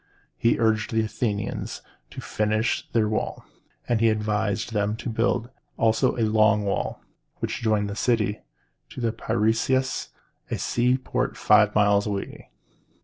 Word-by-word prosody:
He 115 Hz, -, +2 dB
urged 110 Hz, -1 st, +1 dB
the 110 Hz, -1 st, +2 dB
Athenians 110 Hz, -2 st, -3 dB, 0.3 s
to -, -, -8 dB
finish 110 Hz, +1 st, -1 dB
their 110 Hz, -2 st, +2 dB
walls; 110 Hz, -, -2 dB, 0.4 s
and 120 Hz, -2 st, +1 dB
by -, -, 0 dB
his 115 Hz, -, +5 dB
advice 105 Hz, -1 st, -1 dB
they 110 Hz, +2 st, -2 dB
built 115 Hz, +2 st, 0 dB, 0.3 s
also 115 Hz, +3 st, +2 dB
the 115 Hz, -, 0 dB
Long 110 Hz, -1 st, +3 dB
Walls, 100 Hz, -, -1 dB, 0.4 s
which -, -, -3 dB
joined 110 Hz, -2 st, +1 dB
the 100 Hz, -, -5 dB
city 110 Hz, -3 st, +1 dB, 0.5 s
to -, -, -9 dB
the 115 Hz, -2 st, 0 dB
Pi 115 Hz, -, -3 dB
ræ´us, 120 Hz, +4 st, +1 dB, 0.4 s
a -, -, -2 dB
seaport 125 Hz, +2 st, 0 dB
five 105 Hz, -1 st, +4 dB
miles 105 Hz, 0 st, +3 dB
away. 100 Hz, -1 st, -5 dB
110 Hz, 145 wpm, -25 LUFS, 105-115 Hz, 0.5 s, his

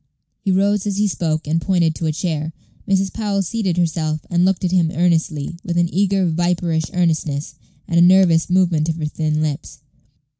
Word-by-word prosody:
He -, -, -1 dB
rose 200 Hz, +2 st, +1 dB
as 200 Hz, -1 st, -2 dB
he 210 Hz, 0 st, +2 dB
spoke, 160 Hz, -4 st, -2 dB
and 165 Hz, +2 st, 0 dB
pointed 175 Hz, -4 st, +1 dB
to 160 Hz, -, -3 dB
a -, -, +1 dB
chair. 160 Hz, -1 st, -3 dB, 0.3 s
Mrs. 195 Hz, 0 st, +1 dB
Powell 205 Hz, -3 st, -1 dB
seated 190 Hz, -2 st, -2 dB
herself, 160 Hz, -3 st, -1 dB
and 175 Hz, 0 st, +2 dB
looked 190 Hz, 0 st, +1 dB
at 175 Hz, -, 0 dB
him 175 Hz, -3 st, +2 dB
earnestly, 170 Hz, -2 st, 0 dB
with 175 Hz, -1 st, -3 dB
an 175 Hz, 0 st, +1 dB
eager, 195 Hz, -1 st, +1 dB
viperish 170 Hz, -1 st, -1 dB
earnestness, 155 Hz, -4 st, -1 dB, 0.3 s
and 170 Hz, 0 st, +2 dB
a -, -, +6 dB
nervous 175 Hz, -2 st, +5 dB
movement 175 Hz, -4 st, +2 dB
of 160 Hz, -, -1 dB
her 160 Hz, -2 st, -4 dB
thin 155 Hz, 0 st, -1 dB
lips. 145 Hz, -2 st, -5 dB
170 Hz, 185 wpm, -19 LUFS, 160-185 Hz, 0.3 s, a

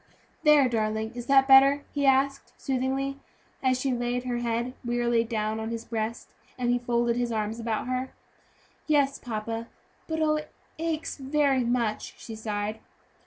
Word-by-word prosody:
"There, 300 Hz, -3 st, +6 dB
darling, 220 Hz, -1 st, -1 dB
is 240 Hz, 0 st, -7 dB
that 270 Hz, -1 st, +5 dB
better?" 275 Hz, +1 st, +7 dB
he 285 Hz, -1 st, +1 dB
asked, 275 Hz, +1 st, +2 dB
soothingly, 270 Hz, +1 st, -1 dB, 0.4 s
as 255 Hz, -1 st, +2 dB
she 265 Hz, 0 st, 0 dB
laid 245 Hz, +1 st, -1 dB
her 245 Hz, -1 st, -2 dB
head 240 Hz, +1 st, -1 dB
wearily 240 Hz, -1 st, +1 dB
down 220 Hz, -1 st, -2 dB
on 220 Hz, 0 st, -3 dB
his 230 Hz, 0 st, -5 dB
breast, 225 Hz, 0 st, -4 dB, 0.2 s
and 245 Hz, -1 st, +1 dB
he 245 Hz, -, +2 dB
folded 240 Hz, -1 st, +1 dB
his 240 Hz, -1 st, 0 dB
arms 220 Hz, +1 st, -2 dB
about 225 Hz, -2 st, -2 dB
her. 255 Hz, +1 st, -2 dB, 0.8 s
"Yes, 285 Hz, -3 st, +2 dB
papa; 225 Hz, 0 st, -4 dB, 0.4 s
but, 320 Hz, 0 st, -2 dB
oh, 305 Hz, -1 st, +2 dB
it 305 Hz, 0 st, -7 dB, 0.3 s
aches 325 Hz, -1 st, -2 dB
very 275 Hz, -1 st, +2 dB
much," 235 Hz, -3 st, -1 dB
she 225 Hz, -, -8 dB
sighed. 215 Hz, 0 st, -3 dB
245 Hz, 160 wpm, -27 LUFS, 230-270 Hz, 0.8 s, better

